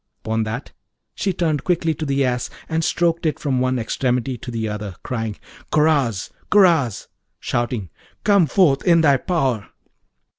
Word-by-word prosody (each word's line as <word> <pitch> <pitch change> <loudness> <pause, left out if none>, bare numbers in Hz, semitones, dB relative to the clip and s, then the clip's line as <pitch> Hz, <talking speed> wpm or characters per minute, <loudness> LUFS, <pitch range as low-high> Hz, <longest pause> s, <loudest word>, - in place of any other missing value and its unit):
Upon 110 0 0
that, 115 +5 -5 0.4
she 195 - -1
turned 160 -5 -1
quickly 165 -2 +1
to 155 0 -5
the 140 0 +1
Ass 125 -1 -1 0.2
and 160 0 -1
stroked 170 0 +1
it 155 - -1
from 135 -4 -1
one 130 0 +1
extremity 125 +2 -1
to 125 - -8
the 115 -2 -2
other, 105 -3 -5
crying, 115 -4 -3 0.4
'Karaz! 145 -10 +2 0.2
Karaz!' 165 - +3 0.3
shouting, 120 - -2 0.3
'Come 200 -5 +4
forth 150 -8 +3
in 170 -2 +5
thy 140 -4 +5
power!' 130 - -1
135 Hz, 150 wpm, -21 LUFS, 115-165 Hz, 0.4 s, in